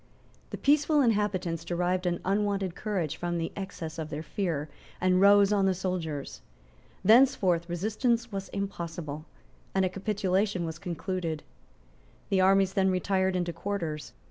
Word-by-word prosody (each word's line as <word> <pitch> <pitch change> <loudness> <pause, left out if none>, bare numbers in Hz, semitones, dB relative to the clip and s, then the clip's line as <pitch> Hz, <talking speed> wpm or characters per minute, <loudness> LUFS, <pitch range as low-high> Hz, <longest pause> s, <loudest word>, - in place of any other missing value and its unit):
The - - -5
peaceful 295 +1 +3
inhabitants 195 -7 0
derived 180 +2 0
an 175 -1 -1
unwonted 200 -1 0
courage 175 -8 -2
from 175 0 -2
the 165 0 -2
excess 175 -5 -6
of 155 -1 -4
their 155 +1 -5
fear, 165 -6 -2 0.3
and 185 0 +3
rose 200 0 +6
on 195 -2 +3
the 190 - +2
soldiers. 160 - -4 0.6
Thenceforth 190 -7 +4
resistance 225 +6 0
was 195 -1 -5
impossible; 170 -6 -5 0.5
and 190 -1 +3
a - - +1
capitulation 195 -1 0
was 160 -1 -6
concluded. 180 -3 -3 0.9
The 190 -1 +3
armies 195 0 +4
then 190 0 +3
retired 190 0 +1
into 175 -1 -1
quarters. 165 -4 -4
185 Hz, 140 wpm, -28 LUFS, 170-200 Hz, 0.9 s, rose